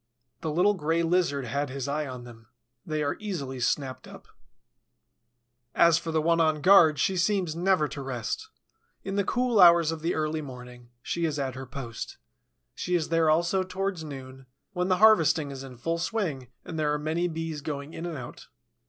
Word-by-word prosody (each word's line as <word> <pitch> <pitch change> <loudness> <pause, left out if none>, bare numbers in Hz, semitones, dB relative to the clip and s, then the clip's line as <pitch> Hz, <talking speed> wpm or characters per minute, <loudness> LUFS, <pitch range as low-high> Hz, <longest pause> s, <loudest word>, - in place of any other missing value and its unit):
The 160 - -3
little 180 +7 +3
Gray 165 -2 0
Lizard 165 -6 +1
had 140 +4 -2
his 135 0 -4
eye 150 +1 -2
on 125 -2 -7
them, 115 -2 -14 0.4
they 155 -1 -2
are 145 - -1
easily 150 -12 -4
snapped 130 +1 -2
up. - - -13 1.5
As 170 -1 +5
for 165 - -5
the 160 -1 +1
one 165 +1 +3
on 155 -1 +2
guard, 165 -3 +6
she 190 - +1
seems 180 -2 0
never 180 -3 +2
to 140 - -6
rest. 125 -4 -4 0.5
In 195 0 -4
the 200 - +2
cool 245 +1 +1
hours 170 -3 +7
of 160 -1 -5
the 170 +2 -1
early 155 0 -1
morning, 125 -3 -11
she 170 -1 -1
is 155 -2 -1
at 135 -2 -2
her 130 +1 -8
post. 120 -3 -7 0.6
She 180 - -2
is 165 -3 0
there 165 -1 +3
also 170 +4 +2
towards 185 -1 -3
noon, 135 -3 -9 0.3
when 180 -1 -1
the 185 -1 +2
harvesting 165 -8 +4
is 135 -1 -7
in 130 -2 -10
full 165 +7 -2
swing 170 - -2 0.2
and 160 -2 -5
there 150 -1 +1
are 150 - +1
many 160 +4 -1
Bees 165 -2 -4
going 145 +1 -5
in 170 - -5
and 165 -3 -5
out. 125 - -9
155 Hz, 190 wpm, -27 LUFS, 140-175 Hz, 1.5 s, hours